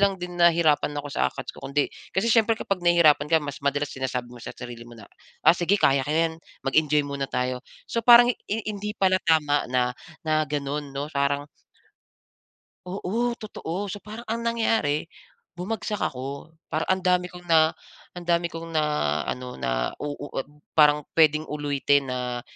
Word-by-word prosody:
lang 200 -1 +3
din 180 0 -6
nahirapan 165 -4 +4
ako 145 - -8
sa - - +2
acads - - -7
ko - - -14
kundi 140 +1 0 0.2
kasi 215 +4 +1
siyempre 225 -1 +4
kapag 195 -4 -2
nahihirapan 170 -4 +4
ka 165 - +5
mas 145 -1 -6
madalas 145 +1 -1
sinasabi 125 -2 -4
mo 120 - -12
sa - - -7
sarili 120 -1 -8
mo - - -13
na, 110 - -12 0.4
"Ah, - - +8
sige 180 +4 +2
kaya 135 0 +4
ko 150 - -2
'yan 165 0 +1 0.3
mag-enjoy 150 +1 +3
muna 140 -1 -3
tayo". 125 0 -1 0.3
So, 230 - -1
parang 240 0 +9
i - - -14 0.2
i 225 - 0
hindi 210 +1 -4
pala 185 -1 +3
tama 150 -3 +3
na, 125 -1 +2 0.3
na 155 0 +2
gano'n 145 0 -3
'no, 140 +2 -4
parang 140 +1 0 1.4
Oo, 225 +6 -2
totoo. 200 -2 -5
So 205 - -8
parang 220 +3 -9
ang 230 +1 -3
nangyari 225 -10 +1 0.5
bumagsak 205 +3 -4
ako. 140 +5 -5
Para 155 0 -1
ang 190 0 +1
dami 180 0 +2
kong 175 0 -12
na 160 -2 +4 0.4
ang 175 - -7
dami 170 0 +1
kong 165 0 -8
naano 125 - -1
nau - - -1
u 145 0 -5
ut 135 - -3 0.3
parang 150 -1 +5
pwedeng 155 -1 +4
ulitin 145 -2 0
na, 125 -1 -3
155 Hz, 175 wpm, -25 LUFS, 140-180 Hz, 1.4 s, parang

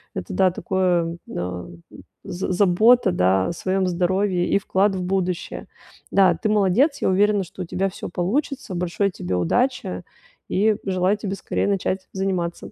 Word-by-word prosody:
это, - - -5
да, 190 -1 +3
такое, 175 -2 0
м, 90 -1 -6
э, - - -14 0.3
з 185 +1 -4
забота, 205 +3 +4
да, 95 - +2
о - - -2
своем 190 +2 -1
здоровье 180 +1 0
и - - +3
вклад 195 0 +1
в 185 - -3
будущее. 180 -1 -2 0.4
Да, 190 -3 +5
ты 190 +6 -2
молодец. 215 - +2
Я - - +2
уверена, 205 +1 +3
что 185 +1 -10
у - - -3
тебя 190 +3 -1
всё 185 - -7
получится. 220 - -2
Большой 180 +3 -1
тебе 90 - -4
удачи 90 - 0 0.5
и 210 +3 +2
желаю 185 +1 +1
тебе 200 -2 -4
скорее - - -2
начать 190 -1 -1
заниматься. 185 -3 -3
185 Hz, 160 wpm, -22 LUFS, 175-200 Hz, 0.5 s, Да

